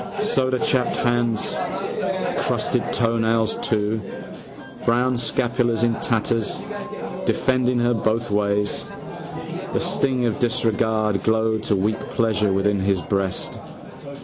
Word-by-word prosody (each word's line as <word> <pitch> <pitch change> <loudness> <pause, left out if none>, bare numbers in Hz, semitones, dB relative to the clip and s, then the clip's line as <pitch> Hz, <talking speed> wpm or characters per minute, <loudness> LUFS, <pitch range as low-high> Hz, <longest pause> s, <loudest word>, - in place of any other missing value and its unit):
Sodachapped 130 0 +1
hands. 120 -2 +1 0.9
Crusted - - +1
toenails 115 -1 +1
too. 110 0 0 0.8
Brown 125 +2 +2
scapulars 120 -1 +1
in 120 -1 +3
tatters, 115 -1 0 0.7
defending 130 -1 +2
her 120 0 +3
both 115 0 0
ways. 105 0 +1 0.9
The - - +2
sting 130 -3 +1
of 115 -3 -1
disregard 110 -3 +1
glowed 110 0 +1
to 105 - +2
weak 105 +3 0
pleasure 105 -3 +1
within 100 +1 +2
his 95 0 +1
breast. 95 +2 -2
115 Hz, 100 wpm, -23 LUFS, 105-120 Hz, 0.9 s, in